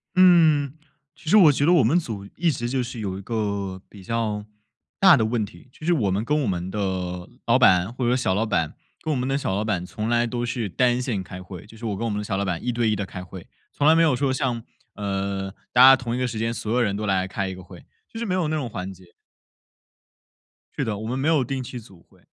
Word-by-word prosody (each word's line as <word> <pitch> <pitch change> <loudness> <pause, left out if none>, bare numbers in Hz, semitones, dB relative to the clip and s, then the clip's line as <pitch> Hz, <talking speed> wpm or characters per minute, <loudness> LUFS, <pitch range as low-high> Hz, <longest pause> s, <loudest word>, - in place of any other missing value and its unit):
嗯， 160 -7 +5 0.4
其 165 -2 -8
实 215 - +6
我 165 -7 +8
觉 145 +1 +1
得 175 - +5
我 155 -8 +5
们 150 +10 +3
组 105 - -6
一 170 -1 +2
直 120 -3 -3
就 130 -1 0
是 120 -1 -7
有 95 -3 -3
一 - - -7
个 100 -4 -3
比 100 -2 -13
较 105 -1 -2 0.5
大 190 -7 +7
的 110 - +2
问 110 -1 0
题， 110 +5 -11
就 155 - -12
是 175 - +4
我 105 - +1
们 100 +4 0
跟 150 +4 +1
我 125 - -1
们 90 -1 -2
的 90 -3 -3 0.2
老 - - +5
板 90 +4 +4
或 125 -1 -2
者 125 - +3
小 95 -7 0
老 110 +2 +1
板 85 -8 -1 0.3
跟 155 - -2
我 140 - 0
们 125 - -1
的 135 +1 +1
小 95 -8 -2
老 105 - 0
板 100 -5 -1
从 105 +5 -4
来 120 0 +2
都 120 +1 -2
是 120 -4 -3
单 125 +5 +2
线 110 -7 -2
开 90 0 -9
会， 90 -1 -10
就 110 - -15
是 115 +1 -9
我 100 -3 -2
跟 115 - -3
我 - - 0
们 105 - -2
的 - - -4
小 95 -1 -2
老 100 - -1
板 90 -3 -3
1 125 - 0
对 120 -1 +1
1 105 - +1
地 100 - -2
开 90 -1 -8
会。 95 -1 -11 0.3
从 145 - +1
来 160 - +7
没 165 - +5
有 155 -5 +3
说 135 +1 0
像， 125 -4 -1 0.3
呃， 100 -1 -3 0.2
大 125 - +5
家 135 +1 +10
同 120 -2 -4
一 125 - -2
个 125 - 0
时 115 -2 -5
间 115 +1 -1
所 110 -1 -4
有 125 - +2
人 100 -4 +1
都 105 0 -3
来 95 -1 +1
开 95 0 -3
一 95 - -6
个 95 - -11
会， 90 0 -13 0.2
就 225 - -9
是 235 - -2
没 185 -4 -1
有 175 -4 0
那 155 - -1
种 135 -6 -3
环 95 -1 -5
节。 90 -1 -19 1.6
是 - - -1
的， 105 -2 -2
我 110 +1 -6
们 130 +2 -2
没 140 - 0
有 155 -5 +3
定 130 +1 -3
期 125 0 -7
组 95 -6 -17
会。 - - -24
115 Hz, 290 characters per minute, -24 LUFS, 95-130 Hz, 1.6 s, 家